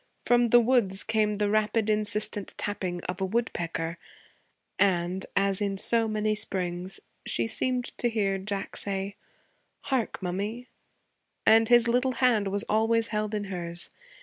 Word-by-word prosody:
From 240 0 +4
the 240 +1 +7
woods 225 -6 +2
came 215 -1 +1
the 205 0 0
rapid, 215 0 +1
insistent 210 -1 -1
tapping 185 -4 -3
of 180 +1 -5
a - - +2
woodpecker; 170 -6 -2 0.8
and, 185 -1 +1
as 195 0 +1
in 200 -1 -1
so 230 +3 +2
many 215 0 0
springs, 185 -3 -3 0.2
she - - 0
seemed 245 +2 -2
to 240 - +1
hear 200 -4 0
Jack 200 0 -4
say, 200 0 +1 0.7
'Hark, 260 -5 -1
mummy,' 205 +7 -4 0.8
and 225 0 +6
his 240 -1 +6
little 250 +2 +2
hand 235 -6 +2
was 200 +1 -1
always 225 +1 +2
held 215 -1 -2
in 210 - -2
hers. 175 -3 -5
210 Hz, 145 wpm, -27 LUFS, 195-225 Hz, 0.8 s, the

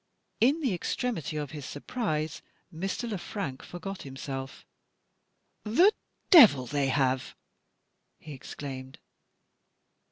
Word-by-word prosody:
In 280 +8 +4
the 260 -9 +1
extremity 175 - -2
of 145 -2 -4
his 150 -2 -7
surprise, 155 - -3 0.3
Mr. 195 +8 -3
Le 210 -5 -3
Frank 160 -10 -5
forgot 185 +3 -7
himself. 135 0 -7 1.0
"The 345 - +5 0.4
devil 215 - +9
they 140 +2 0
have!" 130 -1 0 0.8
he 155 - -10
exclaimed. 130 -1 -8
155 Hz, 100 wpm, -29 LUFS, 135-210 Hz, 1.0 s, devil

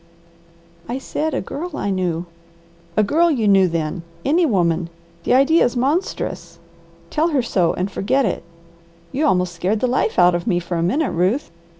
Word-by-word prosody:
"I 245 - -2
said 300 +3 -3
a - - -1
girl 330 0 -6
I 200 - -1
knew!" 180 -3 -1 0.7
"'A 215 - +5
Girl 330 +11 +3
you 240 -9 +1
knew,' 195 -2 +5
then! 165 0 -2 0.2
Any 325 +4 +3
woman! 170 - +1 0.4
The - - +3
idea 280 +6 +5
is 245 - 0
monstrous. 280 - -2 0.5
Tell 315 +2 +2
her 290 -7 +1
so 180 -7 +1
and 185 +3 -2
forget 255 +8 +1
it. 195 - -1 0.7
You 295 +3 +1
almost 180 -6 +1
scared 185 +5 -1
the 255 - +1
life 250 -2 0
out 180 0 +6
of 175 +5 -2
me 180 -5 +2
for 175 0 -4
a 165 - 0
minute, 265 - +1
Ruth. 185 - 0
210 Hz, 180 wpm, -20 LUFS, 180-280 Hz, 0.7 s, out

